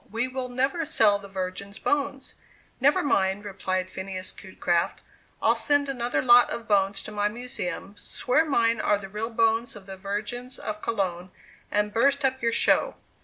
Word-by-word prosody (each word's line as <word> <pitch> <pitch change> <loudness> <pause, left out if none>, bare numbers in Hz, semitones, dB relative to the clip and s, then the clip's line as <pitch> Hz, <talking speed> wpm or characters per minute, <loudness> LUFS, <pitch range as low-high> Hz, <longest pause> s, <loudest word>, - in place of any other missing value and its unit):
We 230 +3 0
will 255 0 -4
never 270 +7 0
sell 215 -9 +3
the 200 - -11
Virgins' 195 +1 -5
bones!" 280 -2 -1 0.5
"Never 280 +3 +4
mind," 200 -7 +1
replied 185 -2 -2
Phineas 190 -1 -5
Cutecraft, 175 -2 -1 0.4
"I'll - - +5
send 285 -1 +1
another 245 -2 -1
lot 245 -1 +7
of 230 - -5
bones 200 -1 +2
to - - -7
my 205 0 +1
Museum, 210 -4 -5
swear 255 +6 0
mine 230 -7 +2
are 210 - +2
the 195 -1 -9
real 210 +3 -3
bones 225 0 +1
of 205 -2 -11
the 190 -1 -8
Virgins 210 +6 -4
of 210 0 -5
Cologne, 185 -5 -2 0.4
and 210 0 0
burst 275 +4 +3
up 260 0 0
your 230 -1 +2
show!" - - +3
220 Hz, 170 wpm, -26 LUFS, 195-250 Hz, 0.5 s, lot